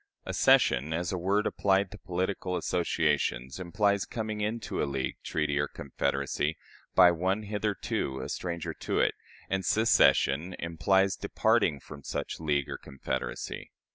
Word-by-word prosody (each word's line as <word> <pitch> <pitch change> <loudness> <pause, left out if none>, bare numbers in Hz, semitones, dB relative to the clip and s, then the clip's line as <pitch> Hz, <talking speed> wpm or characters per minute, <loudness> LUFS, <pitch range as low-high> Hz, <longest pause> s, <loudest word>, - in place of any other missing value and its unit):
Accession, 75 +6 +3
as 85 +1 -1
a 95 - -1
word 100 +4 +1
applied 95 0 +1
to 105 - -9
political 90 0 -2
associations, 75 -6 0
implies 100 +2 +1
coming 110 -2 -4
into 110 +2 -2
a - - +2
league, 65 -1 -2
treaty, 75 -2 0
or 75 - +1
confederacy, 70 +2 -2 0.4
by 90 -1 +8
one 95 +5 0
hitherto 105 -10 -2
a - - -4
stranger 85 -2 -4
to - - -2
it; - - +3 0.3
and 95 -1 -1
secession 90 -7 +3
implies 95 +3 +2
departing 100 -6 +1
from 70 0 -11
such - - -4
league 75 -4 0
or - - -6
confederacy. 65 -2 -5
90 Hz, 140 wpm, -29 LUFS, 75-100 Hz, 0.4 s, by